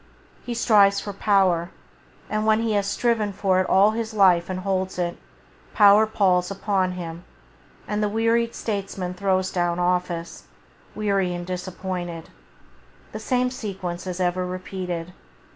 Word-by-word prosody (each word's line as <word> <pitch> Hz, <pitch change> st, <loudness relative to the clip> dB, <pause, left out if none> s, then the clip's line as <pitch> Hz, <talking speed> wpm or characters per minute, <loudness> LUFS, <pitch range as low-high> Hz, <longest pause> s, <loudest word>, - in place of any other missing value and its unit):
He 240 Hz, -1 st, -4 dB
strives 200 Hz, -4 st, +4 dB
for 205 Hz, -, -6 dB
power, 190 Hz, -4 st, +2 dB, 0.6 s
and 215 Hz, 0 st, -1 dB
when 220 Hz, 0 st, +3 dB
he 225 Hz, -1 st, 0 dB
has 200 Hz, -1 st, +1 dB
striven 220 Hz, -1 st, 0 dB
for 190 Hz, -1 st, +1 dB
it 185 Hz, -, -3 dB
all 200 Hz, +3 st, +5 dB
his 220 Hz, 0 st, -4 dB
life 185 Hz, -4 st, +4 dB
and 185 Hz, 0 st, -3 dB
holds 190 Hz, -1 st, -2 dB
it, 175 Hz, -1 st, -1 dB, 0.6 s
power 210 Hz, +1 st, +6 dB
palls 185 Hz, -4 st, +2 dB
upon 195 Hz, -2 st, -1 dB
him, 170 Hz, -1 st, -7 dB, 0.6 s
and 210 Hz, 0 st, -1 dB
the 210 Hz, -, +1 dB
wearied 230 Hz, +2 st, +1 dB
statesman 195 Hz, -4 st, -4 dB
throws 185 Hz, 0 st, 0 dB
down 175 Hz, -1 st, 0 dB
office, 180 Hz, -1 st, -2 dB, 0.5 s
weary 195 Hz, -4 st, 0 dB
and 175 Hz, 0 st, -5 dB
disappointed. 180 Hz, -2 st, -5 dB, 0.8 s
The 215 Hz, -, -6 dB
same 250 Hz, +3 st, 0 dB
sequence 190 Hz, -7 st, -5 dB
is 180 Hz, 0 st, -4 dB
ever 180 Hz, 0 st, 0 dB
repeated. 180 Hz, -1 st, -5 dB
190 Hz, 145 wpm, -23 LUFS, 180-210 Hz, 0.8 s, power